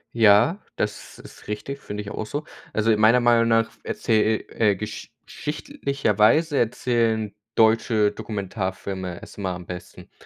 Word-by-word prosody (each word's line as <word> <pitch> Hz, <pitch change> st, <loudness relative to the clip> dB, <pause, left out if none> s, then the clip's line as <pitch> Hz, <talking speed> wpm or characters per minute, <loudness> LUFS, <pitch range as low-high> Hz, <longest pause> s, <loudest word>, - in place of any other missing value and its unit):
Ja, 115 Hz, -, +5 dB, 0.2 s
das 105 Hz, 0 st, -4 dB
ist -, -, -14 dB
richtig, 135 Hz, +7 st, -5 dB
finde 105 Hz, -4 st, -6 dB
ich 105 Hz, -, -8 dB
a -, -, -6 dB
auch 110 Hz, -, -4 dB
so. 145 Hz, +6 st, -4 dB, 0.3 s
Also 110 Hz, +1 st, +2 dB
in 105 Hz, -, +2 dB
meiner 115 Hz, +3 st, +6 dB
Meinung 120 Hz, -1 st, +4 dB
nach 115 Hz, -1 st, +3 dB
f -, -, -25 dB
erzähl 110 Hz, -1 st, +1 dB
e 105 Hz, -2 st, +2 dB
äh, -, -, -5 dB
gesch 105 Hz, +3 st, -7 dB
schichtlicherweise 140 Hz, -, +1 dB
erzählen 115 Hz, -3 st, 0 dB, 0.2 s
deutsche 110 Hz, -1 st, +3 dB
Dokumentarfilme 95 Hz, -3 st, -4 dB
es -, -, -12 dB
immer 95 Hz, -2 st, -2 dB
am 90 Hz, 0 st, -8 dB
besten. 90 Hz, 0 st, -9 dB
110 Hz, 160 wpm, -24 LUFS, 105-120 Hz, 0.3 s, meiner